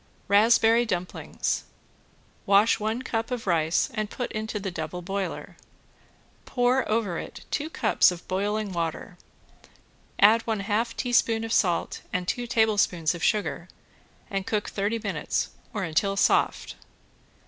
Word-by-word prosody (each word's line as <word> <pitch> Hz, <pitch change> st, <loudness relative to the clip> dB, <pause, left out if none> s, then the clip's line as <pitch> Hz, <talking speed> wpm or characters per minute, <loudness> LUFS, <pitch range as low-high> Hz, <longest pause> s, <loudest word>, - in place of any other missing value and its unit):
~RASPBERRY 225 Hz, +3 st, +5 dB
DUMPLINGS~ 180 Hz, -2 st, -3 dB, 0.8 s
Wash 200 Hz, +3 st, +4 dB
one 220 Hz, +4 st, -2 dB
cup 225 Hz, -2 st, -2 dB
of 250 Hz, -2 st, -4 dB
rice 165 Hz, -3 st, +1 dB
and 215 Hz, -2 st, -2 dB
put 245 Hz, -, -4 dB
into 215 Hz, 0 st, -3 dB
the 195 Hz, -1 st, -4 dB
double 175 Hz, +1 st, -5 dB
boiler. 195 Hz, +1 st, -4 dB, 0.9 s
Pour 250 Hz, +1 st, +1 dB
over 215 Hz, -6 st, 0 dB
it -, -, -9 dB
two 300 Hz, +2 st, -2 dB
cups 220 Hz, -8 st, +3 dB
of 180 Hz, -1 st, -7 dB
boiling 205 Hz, +2 st, -1 dB
water, 170 Hz, +1 st, -3 dB, 1.0 s
add 220 Hz, +3 st, +6 dB
one 220 Hz, -3 st, -1 dB
half 220 Hz, +3 st, -1 dB
teaspoon 230 Hz, -2 st, +2 dB
of 225 Hz, 0 st, -3 dB
salt 175 Hz, -4 st, +1 dB
and 180 Hz, 0 st, -2 dB
two 245 Hz, +4 st, -2 dB
tablespoons 205 Hz, -8 st, +2 dB
of 170 Hz, -, -8 dB
sugar 175 Hz, -2 st, 0 dB, 0.6 s
and 195 Hz, -1 st, -3 dB
cook 210 Hz, -2 st, -1 dB
thirty 205 Hz, +3 st, -1 dB
minutes 225 Hz, -, -2 dB, 0.2 s
or 210 Hz, -4 st, -3 dB
until 195 Hz, +4 st, 0 dB
soft. -, -, +1 dB
210 Hz, 135 wpm, -26 LUFS, 180-225 Hz, 1.0 s, add